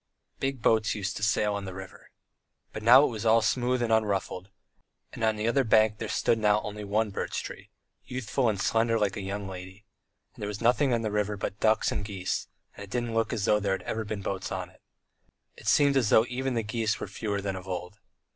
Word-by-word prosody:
Big 135 -3 -2
boats 110 -2 +3
used 100 -1 -3
to - - -6
sail 105 0 +2
on 100 -1 -4
the 95 -1 -7
river. 95 -1 -10 0.6
But 110 - -5
now 125 +5 +8
it - - +2
was 110 -2 -5
all 115 0 +4
smooth 125 +2 +1
and 115 -1 +1
unruffled, 100 -3 0 0.6
and - - -6
on 110 -1 +3
the 105 +1 -2
other 135 +3 +3
bank 110 -2 +3
there 110 - -4
stood 115 - +1
now 105 -1 +3
only 105 0 -6
one 105 +1 0
birch - - -3
tree, - - -9 0.4
youthful 125 0 -1
and 100 -3 -2
slender 115 +2 +2
like 105 -3 0
a 105 - -4
young 100 +1 -4
lady, 95 +2 -9 0.5
and - - -14
there 105 - -2
was 105 -1 -5
nothing 125 +4 +3
on 115 -1 +1
the 110 - -1
river 105 0 -1
but 100 +2 -4
ducks 110 0 +3
and 105 - -2
geese, 95 -3 -3 0.3
and 100 - -8
it - - -19
didn't 120 +1 -2
look 115 0 +1
as 105 -4 -1
though 105 -2 +4
there 100 -2 0
had - - -9
ever 110 - -3
been 105 -2 -5
boats 95 -1 -3
on 95 -1 -4
it. - - -25 0.7
It - - -12
seemed 140 -1 +4
as 125 -6 +3
though 110 - +6
even 130 +1 -2
the 115 - 0
geese 110 0 -1
were - - -4
fewer 105 -3 -3
than 100 -1 -3
of 95 0 -8
old. 90 +2 -5
105 Hz, 230 wpm, -28 LUFS, 100-115 Hz, 0.7 s, now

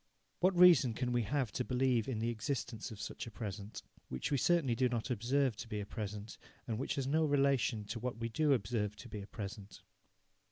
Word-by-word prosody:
What 185 0 +3
reason 165 -10 +7
can 125 +1 -1
we 120 0 +2
have 125 +1 -1
to 125 - -1
believe 125 -3 +1
in 130 -4 -2
the 115 +2 0
existence 120 -1 -3
of 110 - -9
such 110 - -5
a - - -5
present, 105 0 -6 0.3
which 65 - -3
we 140 - +3
certainly 165 -7 +3
do 125 +2 +2
not 120 0 -2
observe 125 +2 +1
to - - -6
be 105 -2 -3
a 100 - -4
present, 105 +1 -6 0.3
and 115 -2 -2
which 135 - -1
has 135 - -1
no 155 +4 +2
relation 140 -6 +2
to 115 +3 -5
what 120 -1 -3
we 115 0 -2
do 145 +5 +2
observe 105 -3 -1
to 120 - -11
be 105 -3 -6
a 100 - -9
present? 100 -2 -8
120 Hz, 215 wpm, -35 LUFS, 105-135 Hz, 0.3 s, reason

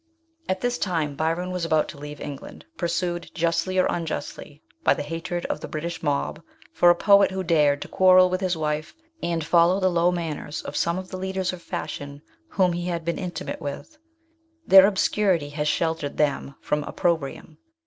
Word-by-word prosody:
At 185 0 -1
this 245 0 -1
time 160 -6 -1
Byron 165 +5 -1
was 180 -1 -3
about 155 -2 +2
to 145 - -10
leave 145 0 -8
England, 140 -2 -8
pur 175 - -2
sued, 175 0 -2
justly 170 +2 0
or 185 - +4
unjustly, 155 -2 -4 0.2
by - - +4
the - - -4
hatred 165 +3 -4
of - - -3
the - - -7
British 170 +2 -5
rnob 145 +1 -1 0.3
for 175 - +5
a 175 - +6
poet 200 +2 +5
who 190 0 -3
dared 150 -4 +2
to - - -10
quarrel 185 -1 +6
with 185 +1 -2
his 180 -3 0
wife 155 0 -2 0.3
and 170 -2 -1
follow 170 +3 +4
the 185 -1 +2
low 175 +1 +3
manners 165 -3 -4
of - - -7
some 170 +1 0
of 185 0 -7
the 185 - -4
leaders 190 0 -2
of 180 - -8
fashion 145 -2 -6 0.2
whom 185 - +1
he 175 +1 -3
had 170 -2 -3
been 170 - -2
intimate 180 -2 -5
with. 145 - -6 0.7
Their 190 0 +9
ob 205 - -1
scurity 185 -8 +1
has 150 0 -2
sheltered 160 -2 -1
them 140 -2 0
from 150 0 -1
opprobrium. 160 -2 -2
170 Hz, 190 wpm, -24 LUFS, 150-185 Hz, 0.7 s, Their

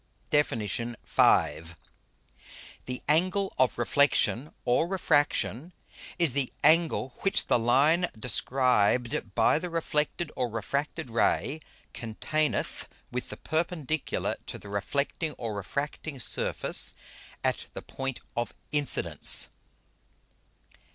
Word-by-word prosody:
_ - - -35
DEFIN. 145 -6 +2
V. 105 -7 +1 1.1
_The 125 0 -5
Angle 185 +6 +1
of 130 -1 +2
Reflexion 140 +1 +2
or 125 +7 +2
Refraction, 160 - 0 0.4
is 170 -7 +1
the 140 -2 -1
Angle 160 -6 +3
which 195 - +2
the - - +2
line 145 +9 +3
described 120 -2 +1
by 115 +6 +3
the 180 - -5
reflected 160 0 -2
or 125 -2 -1
refracted 140 +5 -3
Ray 135 +5 +1 0.3
containeth 145 +7 -2 0.2
with 125 0 -4
the - - -7
Perpendicular 160 -2 -2
to - - -4
the 100 - -12
reflecting 140 - -2
or 115 -2 -5
refracting 140 +7 -5
Surface - - +1 0.5
at - - -1
the - - -7
Point 135 -1 -5
of 120 0 -3 0.2
Incidence. 145 -1 +5
140 Hz, 105 wpm, -28 LUFS, 120-155 Hz, 1.1 s, Incidence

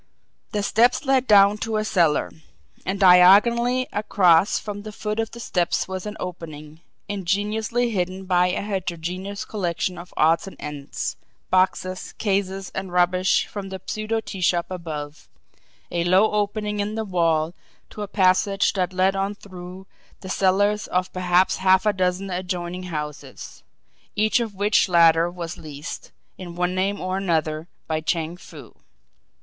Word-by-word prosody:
The 205 -1 -1
steps 240 +7 +3
led 265 -1 +2
down 205 -1 +6
to 220 0 -2
a 215 - -1
cellar; 170 -8 +2 0.6
and 190 +1 -1
diagonally 210 +7 +6
across 195 -3 +3
from 205 -1 -6
the 215 +1 -8
foot 210 +1 -4
of 225 -1 -1
the 235 - -11
steps 175 -6 0
was 190 +1 -5
an 210 - -6
opening, 155 -3 -8 0.3
ingeniously 210 +5 -1
hidden 185 -1 -2
by 180 -1 +3
a 180 - -2
heterogeneous 185 0 -4
collection 180 -3 -2
of 175 +1 -11
odds 165 +4 +3
and 195 - -9
ends, 145 -2 -5 0.3
boxes, 185 0 0
cases, 195 -2 -2
and 190 -2 -5
rubbish 180 +1 +2
from 200 -2 -7
the 190 0 -6
pseudo 215 +1 -2
tea 195 -3 -8
shop 175 -1 +2
above; 155 -4 -7 0.6
a 170 -1 0
low 185 +5 +4
opening 210 0 -1
in 205 +1 -2
the 220 0 -2
wall 165 -4 +1 0.4
to 210 - -8
a 205 - -3
passage 195 0 +2
that 185 -1 -1
led 190 +1 +2
on 195 +1 -1
through 185 -1 -11 0.4
the 190 - -8
cellars 205 +3 +2
of 180 0 -1
perhaps 180 0 +2
half 190 +1 +3
a 210 - +3
dozen 185 +1 -1
adjoining 180 0 -4
houses, 150 -2 -7 0.5
each 215 +3 +2
of 225 -4 -4
which 205 0 +2
latter 165 -1 +5
was 175 -1 -7
leased, 150 +1 -8 0.3
in 175 -2 -8
one 180 +1 0
name 195 +2 -1
or 185 +1 -2
another 160 -4 -1 0.2
by 155 0 -2
Chang 165 +1 -2
Foo. 180 - -13
185 Hz, 155 wpm, -23 LUFS, 175-205 Hz, 0.6 s, down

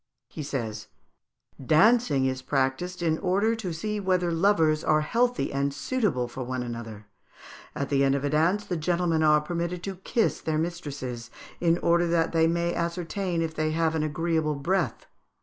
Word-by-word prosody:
He - - -7
says, 115 -7 -4 0.8
"Dancing 155 - +4
is 130 0 -1
practised 140 +7 -1
in 160 -1 +1
order 200 +4 +1
to 210 -6 -4
see 210 +6 -3
whether 185 -3 +1
lovers 165 -3 +2
are 155 0 +3
healthy 240 - 0
and 140 +1 0
suitable 150 - -1
for 125 +2 -7
one 130 0 -3
another: 115 -3 -7 0.7
at 140 - -3
the 140 -1 +2
end 135 0 +3
of 140 - -2
a 145 - 0
dance 175 +7 +2
the 180 -3 -2
gentlemen 170 0 +1
are 150 -1 +5
permitted 170 +2 -3
to 195 -1 -5
kiss 220 +4 0
their 155 -1 -1
mistresses, 145 -8 -4 0.3
in 170 -1 +3
order 170 0 +3
that 165 -1 +1
they 165 -1 +3
may 170 +1 0
ascertain 170 +1 -2
if 160 -1 -3
they 155 0 -1
have 160 0 +1
an 160 - 0
agreeable 155 0 0
breath. 175 +5 -1
165 Hz, 170 wpm, -26 LUFS, 140-180 Hz, 0.8 s, are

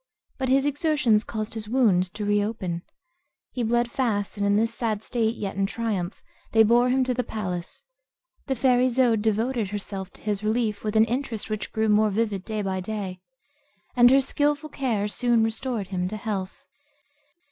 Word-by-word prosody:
But 260 -1 -1
his 270 +1 +3
exertions 290 -7 +2
caused 215 -1 -5
his 215 -2 -5
wound 200 -8 +3
to 210 -1 -3
reopen; 205 -4 -1 0.7
he 250 - -3
bled 240 +1 +1
fast, 210 -7 -1
and 205 - -2
in 200 0 +3
this 225 +2 +2
sad 220 -3 -2
state, 230 -1 0
yet 195 -4 -4
in 195 0 +1
triumph, 200 -3 -3 0.3
they 225 0 +7
bore 240 +3 +4
him 260 +1 +3
to 255 0 0
the 250 +1 -1
palace. 180 -6 -5 0.6
The 265 - 0
fair 250 0 +3
Isoude 250 -3 +3
devoted 220 0 0
herself 195 -2 -5
to - - -16
his 210 -1 -2
relief 215 -1 0
with 215 0 -2
an 220 0 +6
interest 235 -3 -3
which 215 -1 -3
grew 220 0 0
more 215 0 +4
vivid 205 -2 -1
day 215 -2 -3
by 190 -1 -2
day; 190 -2 -5 0.7
and 245 -1 +7
her 270 +2 +6
skilful 290 +3 0
care 235 -8 -1
soon 235 +1 +2
restored 225 -2 -2
him 180 -2 -1
to 215 +3 -5
health. 195 -3 -4
220 Hz, 180 wpm, -25 LUFS, 205-245 Hz, 0.7 s, they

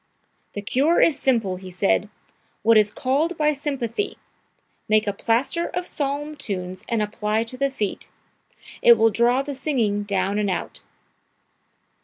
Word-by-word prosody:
"'The 205 - -5
cure 280 +10 +2
is 300 -4 +4
simple,' 225 -8 +1
he 185 0 -10
said; 95 - +1 0.5
'what 230 +1 +5
is 210 -1 +5
called 285 +10 -1
by 300 0 +2
sympathy 275 - -3 0.7
make 215 0 +3
a 205 - -1
plaster 245 - 0
of 360 - -2
psalm 295 0 -3
tunes 185 -9 -5
and 230 -2 +1
apply 210 +1 -1
to 230 +2 -8
the 275 +2 0
feet; 210 -7 -4 0.7
it 235 -1 +7
will 225 +1 +4
draw 240 +4 +2
the 285 0 -5
singing 250 -7 0
down 200 0 -1
and 205 -1 0
out!'" 185 - -4
230 Hz, 150 wpm, -23 LUFS, 205-280 Hz, 0.7 s, it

